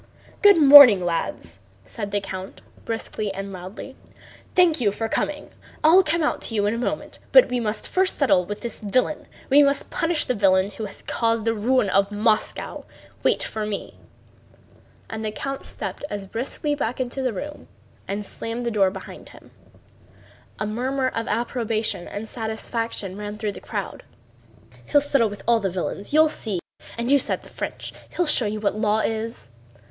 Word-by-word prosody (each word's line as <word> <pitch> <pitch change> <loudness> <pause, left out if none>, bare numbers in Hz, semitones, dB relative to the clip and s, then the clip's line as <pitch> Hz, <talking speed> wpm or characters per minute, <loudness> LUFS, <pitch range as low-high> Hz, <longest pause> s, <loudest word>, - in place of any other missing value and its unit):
"Good 405 -2 +7
morning, 275 - +9
lads!" 95 - -3 0.3
said 200 - -5
the 205 0 0
count 190 -1 -7 0.2
briskly 220 -2 -3
and 195 0 -6
loudly. 185 +8 -9 0.6
"Thank 340 -6 +4
you 205 -4 +3
for 225 +2 -3
coming. 295 +6 -3 0.3
I'll 330 +5 +7
come 335 -2 0
out 300 - 0
to 225 - -3
you 205 -1 +2
in 205 - +1
a 230 - -3
moment, 245 - -4
but - - +7
we 250 - 0
must 215 -2 -3
first 375 +1 +1
settle 255 -11 +3
with 205 +3 -6
the 235 - -3
villain. 255 +8 0 0.2
We 285 +2 +8
must 280 -1 +1
punish 330 -2 0
the 250 - 0
villain 195 -2 +3
who 215 +2 -6
has 200 - -11
caused 230 -1 0
the 225 - +2
ruin 230 +1 +2
of 195 +1 +2
Moscow. 215 +1 -1 0.4
Wait - - +2
for 220 - -4
me!" 210 -1 -4 1.1
And 220 0 -6
the 215 - -2
count 275 +5 -5
stepped - - -4
as 205 -1 -5
briskly 255 +8 -3
back 255 -4 -3
into 255 +1 -2
the 255 -2 0
room 295 +8 -7 0.4
and 205 +1 -3
slammed 230 +4 -5
the 235 - 0
door 200 -3 +3
behind 190 0 -10
him. - - -17 1.1
A 215 - -2
murmur 260 +5 -1
of 230 -2 -4
approbation 225 -3 -1
and 215 +2 -6
satisfaction 220 -3 -3
ran 210 0 -6
through 210 -1 -2
the - - -11
crowd. - - -5 0.9
"He'll 290 - +5
settle 275 -6 +2
with 205 -1 -9
all 235 -1 +4
the 195 -3 -1
villains, 185 +2 -4
you'll 310 +2 +6
see! 215 - -3 0.4
And 235 +3 -1
you 285 - +6
said - - -1
the - - -14
French... - - -6 0.2
He'll 355 - +2
show 265 -7 +3
you 215 +1 -3
what 210 -1 0
law 215 0 +1
is!" 225 - -3
225 Hz, 180 wpm, -23 LUFS, 205-265 Hz, 1.1 s, morning